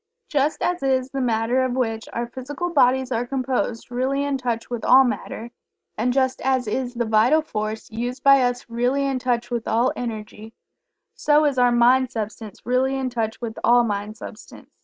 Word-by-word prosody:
Just 290 Hz, +1 st, 0 dB
as 355 Hz, 0 st, 0 dB
is 265 Hz, -1 st, 0 dB
the 275 Hz, -, -2 dB
Matter 240 Hz, +1 st, +1 dB
of 255 Hz, -1 st, -1 dB
which 225 Hz, -3 st, -2 dB
our 235 Hz, -, -2 dB
physical 275 Hz, +8 st, -5 dB
bodies 260 Hz, -3 st, +3 dB
are 235 Hz, 0 st, 0 dB
composed 255 Hz, -3 st, -2 dB
really 265 Hz, +3 st, 0 dB
in 285 Hz, -1 st, -1 dB
touch 235 Hz, -2 st, -3 dB
with 240 Hz, -2 st, -5 dB
all 265 Hz, +1 st, +7 dB
Matter; 235 Hz, 0 st, -4 dB, 0.4 s
and 240 Hz, +3 st, 0 dB
just 260 Hz, 0 st, 0 dB
as 260 Hz, -1 st, +1 dB
is 245 Hz, +3 st, -2 dB
the 235 Hz, 0 st, -1 dB
Vital 225 Hz, +8 st, +3 dB
Force 215 Hz, -5 st, -4 dB
used 245 Hz, +4 st, -4 dB
by 275 Hz, -1 st, +6 dB
us 245 Hz, 0 st, -1 dB
really 245 Hz, +4 st, 0 dB
in 270 Hz, -2 st, -1 dB
touch 245 Hz, -1 st, -1 dB
with 235 Hz, -1 st, -3 dB
all 235 Hz, +3 st, +2 dB
Energy; 220 Hz, -2 st, -7 dB, 0.6 s
so 300 Hz, +1 st, +3 dB
is 280 Hz, -3 st, +1 dB
our 245 Hz, -1 st, +4 dB
Mind 250 Hz, +2 st, +4 dB
substance 220 Hz, -2 st, -6 dB
really 255 Hz, +2 st, +1 dB
in 260 Hz, -1 st, -2 dB
touch 225 Hz, -2 st, -3 dB
with 230 Hz, -2 st, -5 dB
all 240 Hz, 0 st, +5 dB
Mind 210 Hz, 0 st, -3 dB
substance. -, -, -11 dB
245 Hz, 185 wpm, -23 LUFS, 230-265 Hz, 0.6 s, all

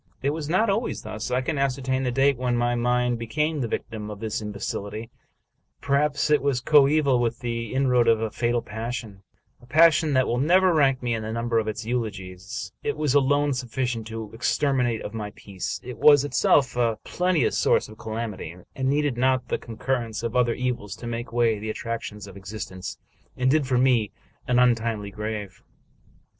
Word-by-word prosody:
It 140 Hz, -, +2 dB
was 155 Hz, -1 st, -4 dB
not 185 Hz, +7 st, +3 dB
always 215 Hz, +4 st, -1 dB
thus. 110 Hz, +3 st, -5 dB
I 125 Hz, +1 st, +1 dB
can 145 Hz, +2 st, -2 dB
ascertain 130 Hz, -1 st, 0 dB
the 125 Hz, -2 st, 0 dB
date 135 Hz, +2 st, +3 dB
when 125 Hz, -1 st, -1 dB
my 120 Hz, 0 st, +1 dB
mind 125 Hz, 0 st, +1 dB
be 115 Hz, -, -5 dB
came 150 Hz, +4 st, 0 dB
the 120 Hz, -, -1 dB
victim 110 Hz, -1 st, -4 dB
of 105 Hz, -1 st, -7 dB
this 110 Hz, 0 st, -3 dB
imbecility; 105 Hz, +1 st, -5 dB, 0.7 s
perhaps 145 Hz, +1 st, +1 dB
it 150 Hz, -3 st, +4 dB
was 140 Hz, -2 st, +1 dB
coeval 140 Hz, 0 st, +4 dB
with 120 Hz, 0 st, -1 dB
the 115 Hz, -2 st, -3 dB
inroad 125 Hz, -3 st, +3 dB
of 115 Hz, -1 st, +4 dB
a 110 Hz, -1 st, -2 dB
fatal 120 Hz, 0 st, 0 dB
passion, 110 Hz, -2 st, -6 dB, 0.2 s
— -, -, -38 dB
a 120 Hz, -, -17 dB
passion 155 Hz, +1 st, +5 dB
that 130 Hz, -1 st, +3 dB
will 120 Hz, -, 0 dB
never 180 Hz, +5 st, +4 dB
rank 135 Hz, -4 st, +3 dB
me 120 Hz, -1 st, 0 dB
in 110 Hz, -, -2 dB
the 110 Hz, 0 st, -4 dB
number 115 Hz, 0 st, 0 dB
of 110 Hz, -, -3 dB
its 110 Hz, +1 st, -4 dB
eulogists; 100 Hz, -5 st, -4 dB
it 145 Hz, -, -2 dB
was 150 Hz, -3 st, +1 dB
alone 145 Hz, +1 st, +3 dB
suffi 130 Hz, 0 st, -3 dB
cient 115 Hz, -3 st, -2 dB
to 110 Hz, -1 st, -6 dB
the -, -, -12 dB
extermination 125 Hz, -2 st, 0 dB
of 105 Hz, -, -6 dB
my 105 Hz, -2 st, -5 dB
peace; 95 Hz, -3 st, -5 dB
it 125 Hz, -1 st, -8 dB
was 145 Hz, -2 st, +6 dB
itself 135 Hz, -1 st, +3 dB
a 115 Hz, -3 st, +1 dB
plente 180 Hz, -6 st, +1 dB
ous -, -, 0 dB
source -, -, +2 dB
of 110 Hz, 0 st, -14 dB
calamity, 110 Hz, -7 st, -5 dB, 0.2 s
and 130 Hz, 0 st, 0 dB
needed 145 Hz, -3 st, +1 dB
not 130 Hz, -1 st, +1 dB
the -, -, -1 dB
concurrence 115 Hz, -1 st, -3 dB
of 115 Hz, +1 st, -3 dB
other 120 Hz, -2 st, +3 dB
evils 120 Hz, -6 st, -3 dB
to 120 Hz, -, -10 dB
take 115 Hz, 0 st, -5 dB
away 115 Hz, -2 st, +2 dB
the 110 Hz, +1 st, -5 dB
attractions 110 Hz, -2 st, -5 dB
of 100 Hz, -1 st, -12 dB
existence 95 Hz, -2 st, -7 dB, 0.4 s
and 130 Hz, +1 st, +2 dB
dig 150 Hz, -2 st, +2 dB
for 130 Hz, -2 st, +2 dB
me 125 Hz, -5 st, +3 dB, 0.4 s
an 125 Hz, -, +2 dB
untimely 115 Hz, -4 st, +2 dB
grave. 105 Hz, -2 st, -5 dB
120 Hz, 200 wpm, -25 LUFS, 110-135 Hz, 0.7 s, was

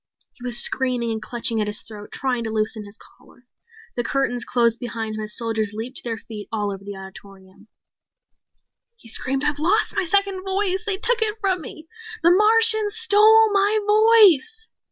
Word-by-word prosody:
He 245 Hz, -, -17 dB
was 245 Hz, -1 st, -2 dB
screaming 250 Hz, -3 st, +1 dB
and 220 Hz, -1 st, -4 dB
clutching 230 Hz, -1 st, -1 dB
at 210 Hz, -, -2 dB
his 210 Hz, 0 st, -4 dB
throat, 210 Hz, -2 st, -11 dB
trying 255 Hz, -3 st, -2 dB
to -, -, -3 dB
loosen 215 Hz, 0 st, -3 dB
his 205 Hz, +2 st, -13 dB
collar. 245 Hz, -, -21 dB, 0.5 s
The 240 Hz, -, -2 dB
curtains 245 Hz, -1 st, -2 dB
closed 235 Hz, -2 st, 0 dB
behind 225 Hz, -3 st, -5 dB
him 215 Hz, -, -5 dB
as 210 Hz, 0 st, -5 dB
soldiers 220 Hz, -2 st, -2 dB
leaped 235 Hz, +4 st, -6 dB
to -, -, -6 dB
their 230 Hz, -2 st, -4 dB
feet 215 Hz, -3 st, -10 dB
all 210 Hz, -2 st, -2 dB
over 195 Hz, 0 st, -9 dB
the 200 Hz, 0 st, -8 dB
auditorium. 190 Hz, 0 st, -14 dB, 1.3 s
He 350 Hz, -, -17 dB
screamed, 265 Hz, +4 st, -1 dB
"I've 295 Hz, 0 st, -1 dB
lost 395 Hz, +8 st, 0 dB
my -, -, 0 dB
second 390 Hz, +1 st, 0 dB
voice! 385 Hz, +1 st, -2 dB
They 405 Hz, -3 st, +3 dB
took 460 Hz, +3 st, 0 dB
it 435 Hz, 0 st, +6 dB
from 375 Hz, -4 st, 0 dB
me! 315 Hz, +1 st, -10 dB, 0.4 s
The 340 Hz, -, +5 dB
Martians 435 Hz, +1 st, +3 dB
stole 440 Hz, 0 st, +5 dB
my 405 Hz, +2 st, +2 dB
voice!" 435 Hz, -, +4 dB
260 Hz, 180 wpm, -21 LUFS, -, 1.3 s, it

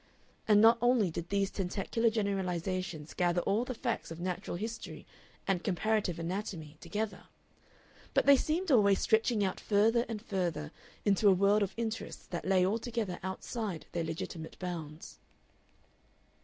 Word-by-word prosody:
And 210 Hz, -2 st, +6 dB
not 230 Hz, +1 st, +7 dB
only 240 Hz, -7 st, +3 dB
did 170 Hz, +2 st, -5 dB
these 200 Hz, -1 st, +1 dB
tentacular 200 Hz, +4 st, 0 dB
generalizations 185 Hz, -6 st, -2 dB
gather 175 Hz, 0 st, +1 dB
all 210 Hz, +7 st, +1 dB
the 255 Hz, -, -4 dB
facts 235 Hz, 0 st, -2 dB
of 165 Hz, 0 st, -7 dB
natural 180 Hz, -1 st, -3 dB
history 225 Hz, +4 st, -6 dB, 0.4 s
and 190 Hz, -3 st, +1 dB
comparative 205 Hz, -1 st, 0 dB
anatomy 165 Hz, -3 st, -4 dB
together, 210 Hz, +5 st, -4 dB, 0.9 s
but -, -, +4 dB
they 280 Hz, -, +8 dB
seemed 320 Hz, +6 st, 0 dB
always 200 Hz, -6 st, +5 dB
stretching 220 Hz, -1 st, +2 dB
out 190 Hz, -1 st, -1 dB
further 225 Hz, +3 st, +3 dB
and 225 Hz, -2 st, -3 dB
further 175 Hz, -8 st, -2 dB, 0.3 s
into 205 Hz, 0 st, +4 dB
a -, -, +7 dB
world 200 Hz, +3 st, +4 dB
of 195 Hz, -1 st, -1 dB
interests 225 Hz, -1 st, -4 dB
that 175 Hz, -, -5 dB
lay 185 Hz, -1 st, +4 dB
altogether 220 Hz, -2 st, -2 dB
outside 190 Hz, 0 st, -4 dB
their 170 Hz, -, -1 dB
legitimate 160 Hz, 0 st, -5 dB
bounds. 165 Hz, -4 st, -6 dB
195 Hz, 140 wpm, -32 LUFS, 175-220 Hz, 0.9 s, they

